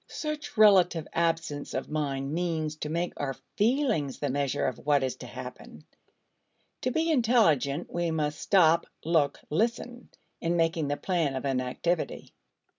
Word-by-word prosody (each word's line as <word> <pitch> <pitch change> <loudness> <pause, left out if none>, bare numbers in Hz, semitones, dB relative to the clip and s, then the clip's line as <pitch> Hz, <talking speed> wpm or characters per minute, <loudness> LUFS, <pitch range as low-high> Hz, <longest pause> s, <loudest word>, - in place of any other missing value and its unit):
Such 305 -4 -5
relative 185 -6 +5
absence 165 -3 -1
of - - -2
mind 140 -2 -2
means 160 -3 -1
to 150 - -4
make 170 +3 -1
our 135 -2 -3 0.2
feelings 220 - +1
the 145 -2 -2
measure 140 -1 0
of 130 - -2
what 145 -2 +2
is 130 -2 -1
to - - -9
happen. 75 - -10 1.0
To 255 - 0
be 320 +5 +1
intelligent 180 - +2
we 175 -1 0
must 150 -2 -1
"stop, 170 -5 +4 0.2
look, 155 -4 +1
listen" 235 +6 -1 0.3
in 170 +1 0
making 165 -2 +1
the 145 0 -1
plan 165 -7 0
of 130 - -4
an 135 -2 +1
activity. 160 +7 -2
165 Hz, 150 wpm, -28 LUFS, 145-195 Hz, 1.0 s, relative